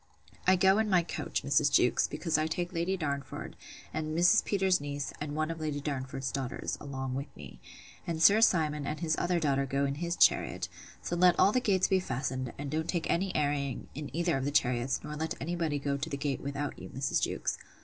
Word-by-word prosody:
—I 185 - +7
go 190 +3 +4
in 220 -1 +1
my 180 -3 +4
coach, 165 -2 -3
Mrs. 145 0 +3
Jewkes, 125 - +3
because 160 +2 -2
I 155 +1 +2
take 175 +2 -3
Lady 175 +3 0
Darnford, 140 -4 -4 0.4
and 155 0 -2
Mrs. 180 +6 +5
Peters's 190 -4 +2
niece, 145 -1 -4
and 150 -1 -4
one 155 +1 0
of 165 - -6
Lady 150 -2 -2
Darnford's 135 -2 -3
daughters, 130 -2 -3
along 135 -2 -4
with 140 +3 -3
me; 70 -4 -11 0.5
and 165 -2 -2
Sir 205 +6 +6
Simon 150 -8 +2
and 150 - -3
his 160 -2 0
other 175 0 +1
daughter 140 -3 +1
go 140 +2 0
in 140 - -1
his 170 0 -1
chariot: - - +3 0.4
so 175 - -2
let 180 0 +5
all 200 - +6
the 255 - +2
gates 190 -5 +2
be 190 -1 +3
fastened; 130 -5 -3
and 140 -1 -5
don't 160 +1 -1
take 170 -3 -1
any 190 +2 0
airing 145 -3 -1
in 150 0 -6
either 170 0 0
of 135 - -2
the - - +1
chariots, 125 -3 +1
nor 150 0 -6
let 160 +2 -3
any 170 +5 -3
body 160 -4 -1
go 140 0 -1
to 150 +4 -4
the 140 - -3
gate, 140 -2 -2
without 140 +1 -4
you, - - -9
Mrs. 135 0 -1
Jewkes. - - -2
150 Hz, 220 wpm, -30 LUFS, 140-175 Hz, 0.5 s, I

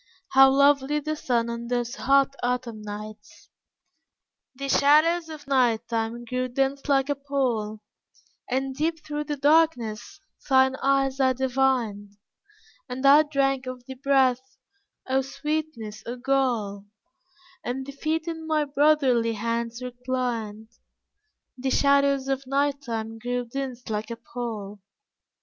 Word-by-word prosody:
How 270 0 +7
lovely 280 +1 +3
the 310 +1 -3
sun 240 -5 0
on 235 0 -5
those 245 0 -1
hot, 275 0 +2
autumn 245 -3 -2
nights! 210 0 -9 1.1
The 275 +1 -5
shadows 310 +5 +4
of 305 -2 -9
night 240 -4 +2
time 230 +1 -3
grew 255 +2 -2
dense 270 +3 -1
like 270 -1 +3
a 290 - +1
pall, 250 -7 -2 0.7
And 265 +1 -1
deep 315 +2 -2
through 295 0 -3
the 295 -1 -3
darkness 280 -5 +1 0.3
thine 265 0 +4
eyes 270 0 +1
I 260 -1 +4
divined, 245 -6 0 0.7
And 260 +2 -4
I 285 +2 +8
drank 275 -3 0
of 250 -1 -7
thy 265 - -7
breath 265 -1 +1 0.5
oh 265 +1 +1
sweetness, 270 -6 -4
oh 240 - -3
gall, 240 -6 -1 0.8
And 260 +2 -3
thy 280 - -7
feet 315 +3 -2
in 325 -1 -5
my 310 -1 +1
brotherly 280 -5 +3
hands 230 +2 -3
reclined, 245 -4 -4 0.9
The 265 +1 -1
shadows 280 0 +3
of 270 -1 -2
Night 280 +1 0
time 225 -3 -5
grew 245 +1 -2
dense 255 0 -6
like 215 0 -3
a 230 - -4
pall. 225 -4 -6
260 Hz, 130 wpm, -25 LUFS, 235-280 Hz, 1.1 s, I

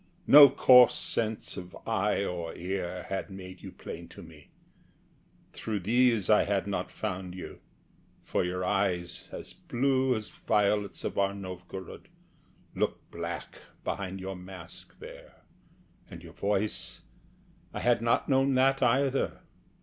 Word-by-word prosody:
No 145 -1 +10
coarse 125 -2 +7
sense 110 -2 -2
Of 90 -1 -8
eye 105 -2 +1
or 85 -3 -4
ear 90 0 -4
had 95 +2 -3
made 95 -1 -10
you - - -8
plain 85 +1 -9
to - - -12
me. 80 -3 -15 1.0
Through 105 -3 -3
these 115 0 +3
I 105 - +5
had 100 -1 0
not 100 -1 -3
found 95 -3 -5
you; 95 - -8 0.6
for - - 0
your 90 +1 -2
eyes, 90 -3 -1
As 60 - -8
blue 130 - +1
as 110 -1 -5
violets 105 -1 0
of - - -2
our 100 0 +1
Novgorod, 95 -1 -8 0.7
Look - - -2
black - - -6 0.2
behind 95 -1 -4
your 95 +1 -5
mask 90 -2 -11
there, - - -13 0.7
and - - -10
your - - -12
voice 105 +1 -2 0.7
I - - -5
had 120 -2 +3
not 115 0 +1
known 135 -1 +3
that 135 +1 +3
either. 135 +2 +1
100 Hz, 135 wpm, -29 LUFS, 90-115 Hz, 1.0 s, No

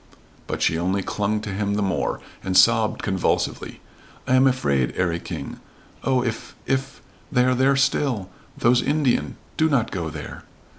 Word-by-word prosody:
But - - -2
she 80 - +2
only 95 +3 0
clung 105 +2 -1
to 105 -2 -5
him 100 +1 -1
the 105 - 0
more, 95 -2 -1 0.2
and 95 -1 +1
sobbed 110 +3 +4
convulsively. 95 -3 -1 0.5
"I - - +2
am 130 +1 +6
afraid 70 - +1
'Arry 85 -2 0
King. - - -7 0.4
Oh, 130 -2 +2
if 115 -2 -4
if 135 0 -2 0.3
they 125 -1 +3
are 130 - +3
there 135 +2 +3
still! 135 -6 +1 0.3
Those 120 +1 +4
Indian! 145 -3 +1 0.2
Do 160 0 +3
not 125 -6 +1
go 85 -4 -3
there." 75 -1 -8
110 Hz, 160 wpm, -23 LUFS, 95-130 Hz, 0.5 s, am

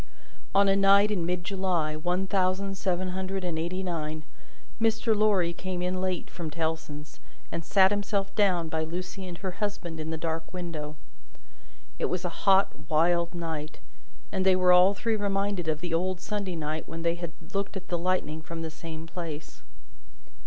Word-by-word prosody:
On 200 0 +6
a 195 - +5
night 200 +1 +6
in 175 -5 0
mid 180 0 -1
July, 180 -5 0
one 180 +4 0
thousand 195 0 +1
seven 185 -1 0
hundred 190 +1 -3
and 170 -3 -1
eighty 180 +3 -2
nine, 155 -3 -3 0.6
Mr. 225 0 +3
Lorry 200 -5 +3
came 180 0 -4
in 185 +1 -1
late, 185 -1 -1
from 170 -3 -5
Tellson's, 160 -1 -4 0.3
and 170 - -3
sat 190 +3 +5
himself 200 -1 0
down 185 -5 +3
by 160 0 -1
Lucie 180 +3 -5
and 175 -1 -6
her 190 0 -3
husband 180 -4 -3
in 155 0 -4
the 160 - -2
dark 160 0 -3
window. 165 -5 -5 1.0
It - - +2
was 180 0 -1
a - - +1 0.2
hot, 195 +1 +5 0.2
wild 170 +2 +3
night, 160 -3 -4 0.5
and 190 -2 0
they 190 -1 +5
were 185 0 +5
all 185 +3 +7
three 225 +2 0
reminded 200 -3 0
of 155 -1 0
the 175 -2 -3
old 180 +2 +1
Sunday 200 -2 -3
night 155 0 -3
when 165 +1 -5
they 170 0 +3
had 170 -1 -5 0.2
looked 200 0 -1
at 185 - -9
the 175 - +1
lightning 170 -3 0
from 165 +1 -6
the 160 - -4
same 160 0 -7
place. 165 -3 -6
180 Hz, 180 wpm, -28 LUFS, 165-195 Hz, 1.0 s, all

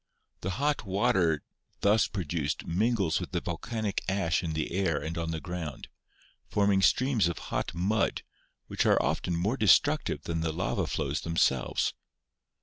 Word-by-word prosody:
The 95 +1 -3
hot 145 -1 0
water 95 -5 +1 0.4
thus 105 +2 +4
produced 80 -6 -3
mingles 95 -1 +1
with 90 +1 -7
the 85 - +1
volcanic 105 +5 -3
ash 90 -5 +1
in 85 -3 -3
the 80 -1 -2
air 95 -2 +1
and 80 +1 -4
on 85 -1 -2
the 80 -1 -2
ground, 85 -5 -6 0.6
forming 100 -1 +3
streams 125 -1 +3
of 85 - -3 0.2
hot - - -2
mud, 95 +4 0 0.4
which - - -1
are - - +5
often 90 - 0
more 100 +10 0
destructive 105 -4 +3
than 80 -1 -2
the 80 0 0
lava 90 +3 -1
flows - - -2
them 85 0 -4
selves. 65 -5 +2
90 Hz, 155 wpm, -29 LUFS, 80-100 Hz, 0.6 s, are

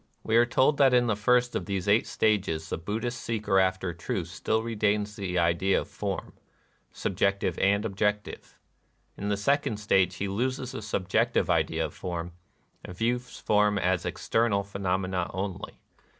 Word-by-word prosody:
We 110 - 0
are 120 +1 +5
told 135 +4 +3
that 135 -3 +6
in 120 0 +4
the 110 -3 +1
first 125 +4 +2
of - - -2
these 100 -1 -2
eight 105 +3 +3
stages 90 -7 0
the - - +1
Bud 105 +7 -3
216 - - -9
NIRVANA 120 - 0
dhist 120 - -8 0.2
seeker 95 - +4
after 95 -1 0
truth 85 - -3
still 110 0 -1
retains 105 -2 0
the 95 -4 -3
ideas 85 +3 +2
of - - -8
form - - -4 0.3
— - - -40
subjective 95 -1 -1
and 100 +2 +2
objective. 105 0 -2 0.6
In 100 - -4
the 100 - +1
second 140 0 +1
stage 95 -3 +2
he 100 - -3
loses 125 +5 -2
the - - -6
subjective 100 -3 0
idea - - +1
of - - -7
form, 85 -1 -5 0.5
and 90 - -9
views 120 +3 -2
forms 105 -1 +2
as - - +1
external 115 -3 0
phenomena 95 -2 -2
only. 95 0 -5
100 Hz, 175 wpm, -27 LUFS, 95-115 Hz, 0.6 s, that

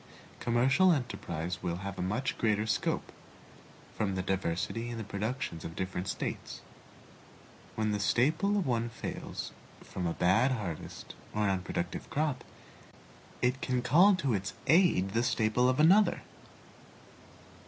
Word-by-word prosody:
Commercial 130 +10 +4
enterprise 90 - -3
will 85 -2 -2
have 100 0 -4
much 105 +9 -1
greater 105 -1 +2
scope, 110 - -1 0.8
from 100 -3 -1
the 95 - -1
diversity 95 +5 -2
in 120 - -5
the 110 - -4
productions 100 -3 -4
of 80 - -7
different 95 0 -3
States. - - -4 1.1
When 110 -1 0
the 105 - -1
staple 155 - +2
of 195 - 0
one 120 -2 0
fails - - -6 0.3
from 90 -2 -4
a 85 - -1
bad 115 +11 +3
harvest 95 -10 -6 0.2
or 105 - +1
unproductive 90 -2 -2
crop, 150 -3 -1 1.0
it 125 +2 +1
can 125 -2 0
call 180 +10 +6
to 140 -9 0
its 100 -1 -2
aid 155 - +4
the 115 +3 +1
staple 125 0 +2
of 130 +2 0
another. 190 +7 +5
115 Hz, 130 wpm, -31 LUFS, 95-130 Hz, 1.1 s, call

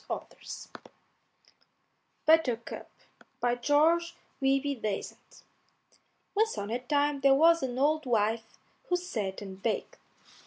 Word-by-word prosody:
BUTTERCUP 260 -8 +2 0.5
BY 245 0 +1
GEORGE 325 +6 +3 0.3
WEBBE 270 -1 +1
DASENT 205 -2 -5 0.9
Once 440 +2 +1
on 205 +2 -4
a 240 - -1
time 285 +2 +1
there 275 0 +6
was 335 +3 +5
an 255 -2 -3
old 300 +1 +2
wife 225 -1 0 0.3
who 360 - +2
sat 215 - -3
and 190 -1 -9
baked. 225 0 -2
270 Hz, 105 wpm, -29 LUFS, 230-315 Hz, 0.9 s, there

